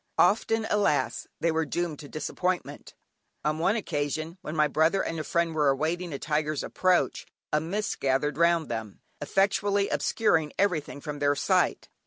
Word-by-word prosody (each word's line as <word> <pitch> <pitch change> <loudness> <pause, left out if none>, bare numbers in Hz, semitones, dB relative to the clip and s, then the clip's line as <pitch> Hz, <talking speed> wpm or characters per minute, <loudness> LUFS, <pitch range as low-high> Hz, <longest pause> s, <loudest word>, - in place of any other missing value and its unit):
Often, 225 0 +3
alas! 145 - +1
they 165 - +2
were 160 0 +1
doomed 165 -1 -3
to 145 - -10
disappointment. 180 +3 -3 0.5
On 155 +1 0
one 190 +6 +2
occasion 155 -3 -3
when 155 - -6
my 150 -1 +4
brother 160 +6 +2
and 165 - -3
a - - -2
friend 170 +1 0
were 150 -2 +3
awaiting 160 +6 -1
a 140 - -3
tiger's 150 0 -1
approach, 185 -1 +1 0.3
a 150 - +3
mist 200 +7 -3
gathered 135 +2 +1
round 170 0 +3
them, 110 -3 -5 0.2
effectually 200 +4 +1
obscuring 160 -9 +1
everything 165 -7 0
from 145 -1 -5
their 145 0 +2
sight. - - +1
160 Hz, 160 wpm, -27 LUFS, 150-180 Hz, 0.5 s, my